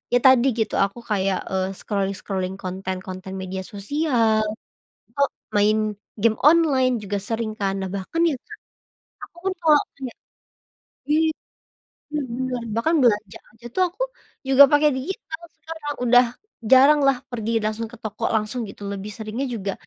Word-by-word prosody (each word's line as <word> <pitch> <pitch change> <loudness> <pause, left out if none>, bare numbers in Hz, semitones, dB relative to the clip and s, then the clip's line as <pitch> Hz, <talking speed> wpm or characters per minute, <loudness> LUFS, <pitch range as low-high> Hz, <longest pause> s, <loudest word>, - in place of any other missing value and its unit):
ya - - +5
tadi 260 0 +6
gitu 220 - 0
aku 200 +4 -8
kayak, 195 -2 +1
eee, 190 0 0
scrolling-scrolling, 195 -1 -2
konten-konten 185 0 -5
media 190 0 -4
sosial, 225 -1 +1 0.7
atau 280 0 +1 0.3
main 210 +1 +4 0.4
game 225 0 +3
online 290 -5 +4
juga 205 0 -3
sering 225 -1 -2
kan. 195 -1 0
Nah, 190 - -3
bahkan 200 - -3
ya 295 - 0
Kak - - -12 0.7
aku - - -19
pun - - 0
kalo 310 -3 +6 0.2
kayak 260 -3 -7 1.0
i - - +5 1.0
bener 295 -2 -2
bener, 255 -2 -2
bahkan 315 +9 +1
belanja 210 -4 +2 0.2
aja 235 +1 -13
tuh 370 - +2
aku 385 +9 -6 0.5
juga 270 +1 +8
pakai 295 +1 +5
digital 320 - -5 0.2
sekarang, 320 -3 -6
udah 245 +1 +6 0.5
jaranglah 275 0 +6
pergi 230 -1 -3
langsung 215 +1 -2
ke 240 - -10
toko 220 - -5
langsung 215 +3 -1
gitu, 205 - -13
lebih 200 +1 -6
seringnya 225 +5 -4
juga 200 -2 -3
230 Hz, 145 wpm, -23 LUFS, 200-275 Hz, 1.0 s, juga